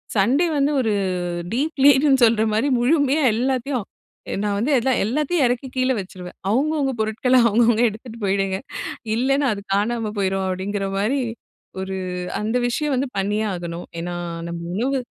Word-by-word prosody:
Sunday 250 - +3
வந்து 280 +1 +2
ஒரு 225 -3 0 0.6
deep 290 +7 -1
லீட்னு 275 -1 +5
சொல்ற 225 -1 +4
மாரி 220 +7 +1
முழுமையா 285 +3 +3
எல்லாத்தையும் 255 -1 -1 0.6
நான் 205 -1 0
வந்து 250 +8 0 0.3
எல்லாத்தையும் 295 - +1
இறக்கி 245 +2 -1
கீழ 255 0 +2
வச்சுருவேன். 185 -2 -8
அவுங்கவுங்க 275 +4 +1
பொருட்கள 220 +4 +2
அவுங்கவுங்க 235 +1 +3
எடுத்துட்டு 225 +2 -10
போயிடுங்க, 195 -1 +1 0.6
இல்லைன்னா, 275 +4 +2
அது 200 - -7
காணாம 220 +1 0
போயிடும் 190 -1 0
அப்டிங்கிற 195 +2 -2
மாரி 220 +8 +1 0.6
ஒரு 190 0 -4 0.4
அந்த 220 +3 -1
விஷயம் 290 +4 -1
வந்து 265 +2 -1
பண்ணியே 205 +3 0
ஆகணும். 175 0 -6
ஏன்னா 175 +1 -4 0.3
நம்ம 170 0 -5
உணவு 265 +6 0
235 Hz, 140 wpm, -22 LUFS, 200-270 Hz, 0.6 s, லீட்னு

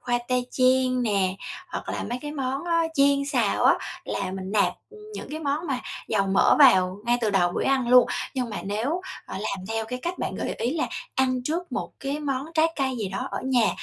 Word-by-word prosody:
khoai 240 -1 0
tây 250 -1 +1
chiên 255 0 +3
nè 195 -4 +1 0.3
hoặc - - -6
là - - -2
mấy 245 - -2
cái 295 - -5
món 275 +1 -2
đó 335 -1 +2
chiên 280 0 +4
xào 280 - +1
á, - - +7 0.3
là 195 -2 -3
mình 190 0 -5
nạp, 210 -2 +3 0.2
ừ, 435 - -14 0.2
những - - -7
cái 310 +1 -5
món 295 +3 -1
mà 260 -3 -1 0.3
dầu 200 -3 +1
mỡ 195 0 +4
vào 190 -9 +6
ngay 240 0 +3
từ 220 -3 +1
đầu 180 -3 +3
buổi - - -1
ăn 270 -3 +2
luôn. 250 0 +7 0.3
Nhưng 250 -3 -2
mà 210 - -5
nếu, 230 - -1 0.3
ờ, - - -7
làm 190 -1 -4
theo 225 0 -1
cái 250 +3 -5
cách 350 +2 -3
bạn - - -3
gợi - - -3
ý 250 +7 -1
là 320 - 0 0.3
ăn 255 -2 +1
trước 340 +5 -3
một - - -3
cái 275 +2 -2
món 275 -2 -2
trái 320 0 +5
cây 265 -2 0
gì 205 - -2
đó 195 +1 -4
ở - - -3
nhà, 250 -5 +3
255 Hz, 230 wpm, -25 LUFS, 215-280 Hz, 0.3 s, á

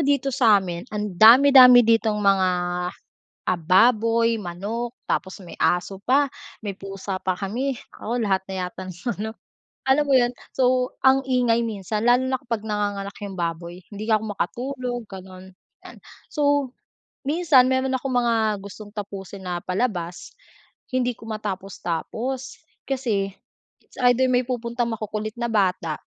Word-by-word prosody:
dito 280 -2 +1
sa'min, 205 -6 +2
ang 210 -1 -4
dami-dami 250 +4 +8
ditong 225 -1 +2
mga, 195 -2 +3 1.0
ah, 185 - 0
baboy, 230 +3 +4
manok, 210 +7 -5
tapos 190 -1 -2
may 170 - -10
aso 185 +2 0
pa, 270 +7 +3 0.4
may 200 - -2
pusa 195 0 -6
pa 185 -1 -1
kami. 240 +7 -2 0.2
Naku, 235 +3 -4
lahat 200 -5 +1
na 190 - -4
yata 185 +1 -8
ng 185 - -7 0.3
ano, 220 - -3 0.6
alam 270 +3 +3
mo - - +4
yun, 245 -1 +2 0.2
so, 255 -1 +2 0.2
ang 265 0 +6
ingay 245 -2 +2
minsan 210 -2 -3
lalo 245 +2 +4
na 260 -1 -1
kapag 230 -5 -4
nanganganak 205 -2 -2
yung 200 -2 -6
baboy 170 +1 -4
hindi 215 +2 -6
ako 215 -1 +3
makatulog, 245 +5 -3
ganun, 190 -1 -11 0.3
yan. - - -11 0.4
So, 285 -3 +1 0.5
minsan 295 -3 +4
meron 260 0 0
akong 260 0 -4
mga 225 -4 +1
gustong 205 +1 -11
tapusin 200 -2 -7
na 175 - -2
palabas, 180 -4 -3 0.6
hindi 250 -2 0
ko - - -13
matapos-tapos 215 +5 -4 0.3
kasi, 220 -8 -1 0.5
it's - - -23
either, 245 +1 +4
may 250 0 +2
pupuntang 235 -1 -2
makukulit 215 0 -4
na 235 0 -1
bata, 185 -7 0
220 Hz, 140 wpm, -23 LUFS, 195-250 Hz, 1.0 s, dami-dami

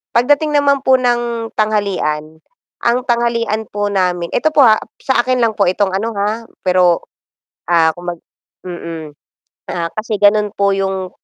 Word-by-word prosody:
Pagdating 290 +6 +3
naman 285 -1 +3
po 265 - +4
ng 240 -2 -1
tanghalian, 190 -8 -1 0.5
ang 235 +1 +3
tanghalian 235 -2 0
po 205 0 -1
namin 180 -3 0
eto 315 - +2
po 295 - +5
ha, 215 -2 +6 0.2
sa 265 - +2
akin 255 -1 +1
lang 230 -2 +2
po 200 - +3
itong 195 +1 +1
ano 225 +4 -2
ha, 215 +3 -2 0.2
pero, 180 -2 +3 0.7
ah, 165 -2 +4
kung 175 +1 -5
mag - - -24 0.5
mm, 165 -3 -7 0.6
ah, 170 -1 -2
kasi 215 0 -2
ganun 210 0 +3
po 200 -1 +1
yung, 190 -1 -2
205 Hz, 155 wpm, -16 LUFS, 180-235 Hz, 0.7 s, ha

